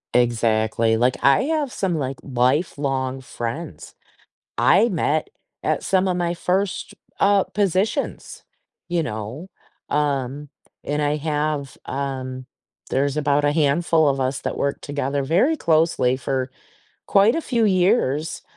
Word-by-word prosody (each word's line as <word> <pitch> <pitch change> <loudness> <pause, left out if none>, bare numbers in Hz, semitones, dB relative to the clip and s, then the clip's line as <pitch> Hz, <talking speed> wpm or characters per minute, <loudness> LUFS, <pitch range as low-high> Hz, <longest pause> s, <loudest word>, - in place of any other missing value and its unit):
Exactly, 115 -2 +2
like, 125 +3 +2
I 140 - +5
have 305 -4 -1
some, 185 -4 -1
like, 135 -2 -3
lifelong 135 0 0
friends 115 - -6 0.6
I 230 +4 +5
met 155 -3 0 0.3
at - - 0
some 190 0 +2
of 180 - 0
my 175 -1 -1
first, 185 +2 -1 0.3
uh, 200 -1 +4
positions, 200 +1 -1 0.4
you 170 -1 0
know? 115 - -6 0.4
Um, 145 -1 -1 0.4
and 145 +1 -1
I 145 +1 +1
have, 150 -2 -2
um 130 -2 -4 0.4
there's 140 +2 0
about 145 -1 +1
a 145 - +4
handful 155 +1 +2
of 135 -1 0
us 130 +2 -1
that - - -3
worked 140 0 -1
together 140 -1 -2
very 205 - +2
closely 155 - +2
for 130 -1 -2 0.6
quite 200 +4 +4
a 330 - 0
few 235 -7 0
years, 180 - +1
145 Hz, 130 wpm, -22 LUFS, 130-175 Hz, 0.6 s, I